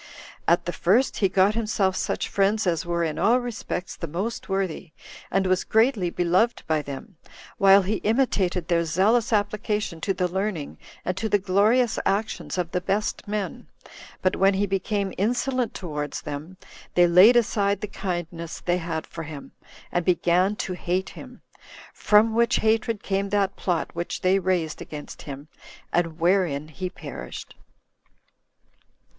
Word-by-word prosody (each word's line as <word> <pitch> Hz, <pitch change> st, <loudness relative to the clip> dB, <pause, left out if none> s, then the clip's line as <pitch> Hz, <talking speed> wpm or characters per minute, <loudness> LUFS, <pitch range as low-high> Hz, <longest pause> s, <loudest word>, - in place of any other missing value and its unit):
At 170 Hz, -, +3 dB
the 175 Hz, -, -3 dB
first 230 Hz, +9 st, +2 dB
he 195 Hz, -, +2 dB
got 190 Hz, +2 st, +3 dB
himself 210 Hz, -4 st, 0 dB
such -, -, -2 dB
friends 200 Hz, +2 st, +1 dB
as 170 Hz, -1 st, 0 dB
were 170 Hz, 0 st, 0 dB
in 155 Hz, -2 st, -2 dB
all 230 Hz, +7 st, +4 dB
respects 240 Hz, -6 st, -5 dB
the 165 Hz, -, -5 dB
most 195 Hz, +9 st, -4 dB
worthy, 190 Hz, -4 st, -2 dB, 0.4 s
and 195 Hz, 0 st, +1 dB
was 185 Hz, -1 st, +2 dB
greatly 220 Hz, -5 st, +2 dB
beloved 180 Hz, +7 st, +1 dB
by 155 Hz, -1 st, +1 dB
them, 150 Hz, +7 st, -9 dB, 0.4 s
while 195 Hz, 0 st, +7 dB
he 205 Hz, +3 st, -1 dB
imitated 200 Hz, -7 st, 0 dB
their 170 Hz, -2 st, +2 dB
zealous 215 Hz, -, +2 dB
application 210 Hz, -4 st, -1 dB
to 195 Hz, -, 0 dB
the 185 Hz, -1 st, 0 dB
learning 190 Hz, -4 st, -3 dB, 0.3 s
and 180 Hz, -, -1 dB
to 220 Hz, +3 st, -2 dB
the 205 Hz, -, +4 dB
glorious 210 Hz, +5 st, +2 dB
actions 210 Hz, -1 st, -1 dB
of 175 Hz, -2 st, -2 dB
the 180 Hz, -, -1 dB
best 205 Hz, +4 st, -2 dB
men; 210 Hz, -1 st, -4 dB, 0.6 s
but 185 Hz, -, +2 dB
when 195 Hz, 0 st, +3 dB
he 200 Hz, +1 st, +1 dB
became 195 Hz, 0 st, -1 dB
insolent 245 Hz, +3 st, 0 dB
towards 150 Hz, -5 st, -4 dB
them, 155 Hz, +5 st, -7 dB, 0.4 s
they 175 Hz, -, +6 dB
laid 180 Hz, +8 st, +7 dB
aside 205 Hz, -4 st, +2 dB
the 210 Hz, -, -3 dB
kindness 175 Hz, -4 st, -5 dB
they 175 Hz, 0 st, 0 dB
had 165 Hz, -2 st, -4 dB
for 165 Hz, -, -8 dB
him, 150 Hz, -3 st, -8 dB, 0.4 s
and 175 Hz, -, 0 dB
began 180 Hz, +2 st, +2 dB
to 190 Hz, -, -3 dB
hate 180 Hz, +2 st, -2 dB
him; -, -, -12 dB, 0.5 s
from 220 Hz, +2 st, +4 dB
which 235 Hz, +1 st, +3 dB
hatred 220 Hz, -1 st, +1 dB
came 195 Hz, 0 st, -1 dB
that 195 Hz, -1 st, +1 dB
plot 175 Hz, -3 st, -2 dB
which 170 Hz, +1 st, -4 dB
they 185 Hz, +1 st, +3 dB
raised 180 Hz, -4 st, -1 dB
against 150 Hz, -1 st, -8 dB
him, 140 Hz, +1 st, -8 dB, 0.5 s
and 165 Hz, -2 st, 0 dB
wherein 170 Hz, -4 st, +1 dB
he 185 Hz, +4 st, -5 dB
perished. -, -, -8 dB
190 Hz, 155 wpm, -25 LUFS, 175-210 Hz, 0.6 s, while